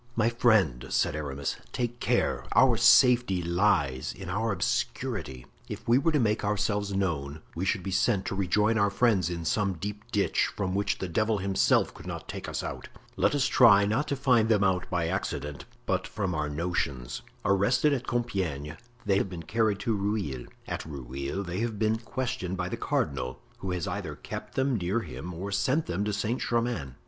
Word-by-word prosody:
"My 115 0 +3
friend," 105 - +2
said - - +1
Aramis, 70 -2 -3
"take 120 -1 -3
care; - - +1
our - - +6
safety 120 -8 +5
lies 85 -7 +1
in 95 -2 -7
our 110 +4 0
obscurity. 100 - -2 0.2
If - - -7
we 120 +3 +5
were 165 +4 +2
to 150 - +2
make 110 -2 +1
ourselves 105 0 0
known 80 -6 -2
we 90 +3 -3
should 95 0 0
be 95 - -4
sent 95 +1 +2
to - - -2
rejoin 105 +4 +2
our 100 -1 +3
friends 100 -4 +2
in 85 -1 -4
some 100 +3 +1
deep 105 +5 -6
ditch, 105 -4 +2
from 95 -2 -1
which 100 +1 0
the 95 - -4
devil 110 +6 +1
himself 95 0 +2
could - - -12
not - - -6
take - - -6
us - - -3
out. - - -6 0.3
Let - - +2
us 140 -2 +2
try 100 -6 +6
not 110 +9 0
to 140 - 0
find 125 -5 +3
them 105 -3 +4
out 95 -2 +1
by 85 -1 0
accident, 75 -5 -3 0.2
but - - 0
from 95 -4 -2
our 75 -2 -1
notions. 70 -6 -2 0.2
Arrested 100 +10 +3
at 130 -2 -3
Compiegne, 90 - -2 0.3
they 100 -1 +3
have - - -1
been 85 -3 -7
carried 110 +3 +1
to 115 - 0
Rueil; 100 - -2 0.2
at - - -3
Rueil 70 +4 -5
they 90 +1 -4
have 115 -2 -2
been 110 +1 +1
questioned 115 -6 -3
by 90 0 -2
the - - -2
cardinal, 65 -2 -2 0.2
who 95 - -5
has 90 -2 -2
either - - -4
kept - - -8
them 130 -2 +1
near 95 +5 0
him 80 - -7
or 95 +4 -5
sent 135 +10 +1
them 90 +3 -2
to 105 - 0
Saint 105 +4 -1
Germain. 115 - -1
100 Hz, 190 wpm, -28 LUFS, 85-115 Hz, 0.3 s, our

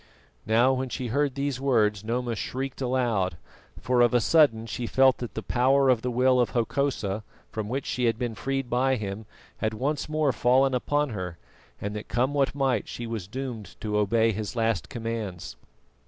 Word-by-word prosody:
Now, 120 +4 +4
when 130 0 -2
she 125 0 -4
heard 140 +2 0
these 140 -2 -2
words 105 -7 +2
Noma 120 +1 -2
shrieked 130 +4 -4
aloud, 120 -9 0 0.4
for 125 -1 +2
of 120 0 +4
a - - +6
sudden 120 -5 +4
she 115 +2 -4
felt 130 +1 +4
that 120 - -6
the 110 - -4
power 135 +2 +3
of 125 -3 +3
the 125 - -2
will 125 +1 +3
of 120 - +1
Hokosa, 115 -4 -1 0.3
from 110 -1 -4
which 135 +3 -2
she 125 - -1
had 115 -1 +2
been 120 -2 -2
freed 135 +6 -2
by 130 +2 +2
him, 105 -1 -5 0.3
had 110 0 -1
once 140 +6 -2
more 155 -2 +2
fallen 130 +2 +3
upon 145 +3 +1
her, 90 -5 -5 0.4
and 100 +1 -4
that 105 - -6
come 130 +4 0
what 140 -1 +1
might 135 -6 +1
she 120 - -6
was 115 -5 -5
doomed 115 -4 -6
to 105 -1 -2
obey 110 +2 +3
his 110 +2 -4
last 115 -4 0
commands. 115 -7 -5
120 Hz, 185 wpm, -26 LUFS, 110-130 Hz, 0.4 s, a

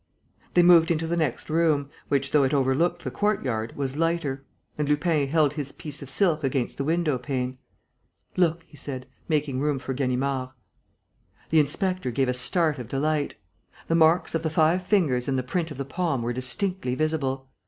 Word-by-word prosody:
They 175 - +6
moved 170 -2 +6
into 165 -1 0
the 170 +1 -1
next 155 -7 -1
room, 155 -3 +1 0.2
which, 140 -1 0
though 150 -2 +4
it 135 +2 +1
overlooked 140 +6 +1
the - - -4
courtyard, 125 - -1
was 135 -1 -2
lighter; 160 -4 -1 0.3
and 150 -1 -2
Lupin 150 -1 +2
held 150 -1 +2
his 145 -3 -3
piece 150 -3 -7
of 140 - -8
silk 160 0 +2
against 130 -2 -1
the - - 0
window 155 -3 0
pane: 130 0 -3 0.8
"Look," 170 -2 +1
he - - -17
said, 130 -2 -5 0.2
making 145 -4 0
room 145 0 0
for 130 0 -4
Ganimard. 130 0 -1 1.0
The 160 - +5
inspector 185 +2 0
gave 130 +2 0
a - - +1
start 150 +4 +2
of 120 - -6
delight. 145 +3 -1 0.5
The - - +2
marks 165 +1 +4
of 165 - 0
the 160 - -1
five 160 +3 +2
fingers 165 -11 +1
and 135 -1 0
the 130 - -1
print 165 +6 -2
of 145 - -8
the 140 - -3
palm 140 -3 -1
were 120 +1 -1
distinctly 130 +3 -1
visible. 135 -3 -1
145 Hz, 185 wpm, -25 LUFS, 130-165 Hz, 1.0 s, They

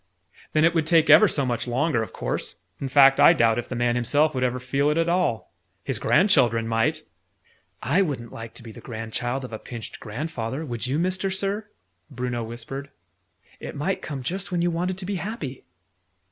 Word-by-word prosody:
"Then 155 +1 +4
it 170 - +3
would 160 -2 0
take 165 -2 +5
ever 215 - +8
so 140 -6 0
much 120 -1 -2
longer, 130 +1 +1
of 110 - -5
course. - - -4 0.2
In 135 - -3
fact, 135 0 +6
I - - +8
doubt 115 -1 +3
if 120 - -6
the 130 - -4
man 120 0 +1
himself 145 +6 +2
would 130 -1 -1
ever 125 0 0
feel 140 +3 0
it, 150 - +1
at 165 0 +2
all. 175 -10 0 0.3
His - - -2
grandchildren 130 - +3
might." 115 0 0 0.8
"I 155 +9 +2
wouldn't 135 - -3
like 115 0 -8
to 120 - -9
be 115 - -9
the - - -12
grandchild 120 +3 -4
of 120 - -10
a 110 - -5
pinched 115 -3 -8
grandfather, 130 +3 -4
would 120 -2 -3
you, 135 +3 0
Mister 185 +3 0
Sir?" 200 +2 -2 0.4
Bruno 125 -2 -3
whispered. 120 +5 -7 0.7
"It - - -7
might 180 +7 -2
come 140 -4 -5
just 190 +8 -3
when 175 -1 0
you 175 - +2
wanted 180 +2 -2
to 190 - -6
be 195 0 -2
happy!" 165 - -6
135 Hz, 200 wpm, -24 LUFS, 120-170 Hz, 0.8 s, ever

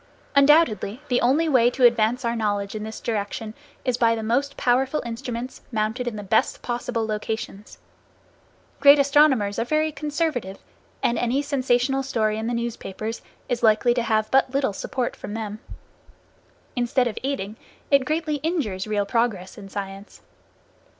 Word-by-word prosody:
Undoubtedly, 275 - +4
the 245 - +2
only 285 +7 +3
way 250 -5 +4
to 250 0 +2
advance 235 +2 +3
our 235 0 0
knowledge 205 -3 -1
in 215 - -5
this 220 +1 -6
direction 215 0 -3 0.3
is 250 -2 +1
by 230 -2 +4
the 225 - -4
most 275 +6 0
powerful 265 +4 +1
instruments, 240 +1 -5
mounted 220 +3 -1
in 235 - -2
the 210 - -6
best 220 +3 +1
possible 240 -1 -2
locations. 215 -1 -5 1.0
Great 280 +1 +8
astronomers 275 -8 +3
are - - +2
very 310 +5 +1
conservative, 295 - -2 0.5
and 235 - +2
any 245 +3 +1
sensational 270 -2 +1
story 220 -5 0
in 220 - -3
the 240 - -1
newspapers 225 -2 -4 0.3
is 245 -2 -2
likely 220 +1 +4
to 240 - 0
have 215 -2 0
but 265 0 +4
little 270 -6 0
support 245 +5 -3
from 205 - -7
them. 215 -1 -5 1.2
Instead 245 +1 +1
of 220 - -4
aiding, 260 -7 -3 0.4
it 280 -1 +5
greatly 310 +1 -1
injures 270 - -2
real 205 -1 0
progress 220 -5 -1
in 200 -2 -11
science. 195 +1 -7
235 Hz, 155 wpm, -24 LUFS, 215-270 Hz, 1.2 s, Great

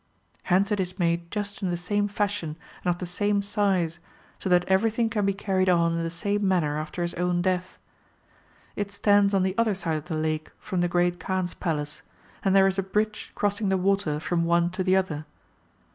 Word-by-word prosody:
^^ - - -31
Hence 190 +4 +2
it 205 - +1
is 185 0 -2
made 170 -1 0
just 205 +1 -4
in 190 - 0
the 175 - -1
same 205 +4 0
fashion 205 -6 -2 0.3
and - - 0
of 175 - -2
the 180 - -5
same 200 +3 0
size, 195 -5 0 0.4
so - - -3
that 180 -1 +4
everything 225 +4 +2
can 205 -3 +1
be 200 - +2
carried 190 -2 +1
on 170 -2 +3
in 165 - -1
the 165 - -2
same 200 +4 -1
manner 165 -6 +1
after 155 +3 -4
his 175 - -2
own 175 0 0
death. 185 -1 -1 1.0
[It 205 -1 -3
stands 200 0 +3
on 190 - +3
the 190 0 0
other 220 -3 +2
side 165 -4 -1
of 150 - -7
the 165 - -3
lake 155 0 -1
from 185 -2 -2
the 175 - +2
Great 175 0 +1
Kaan's 185 0 -2
Palace, 150 -4 -3 0.4
and 195 -1 +3
there 195 0 +7
is 195 0 +1
a - - +3
bridge 210 +3 -2
crossing 205 0 0
the 190 - +2
water 185 -5 +1
from 170 +1 0
one 170 +1 +2
to 185 +1 -2
the 185 0 +3
other. 155 -6 -1
185 Hz, 215 wpm, -26 LUFS, 170-200 Hz, 1.0 s, there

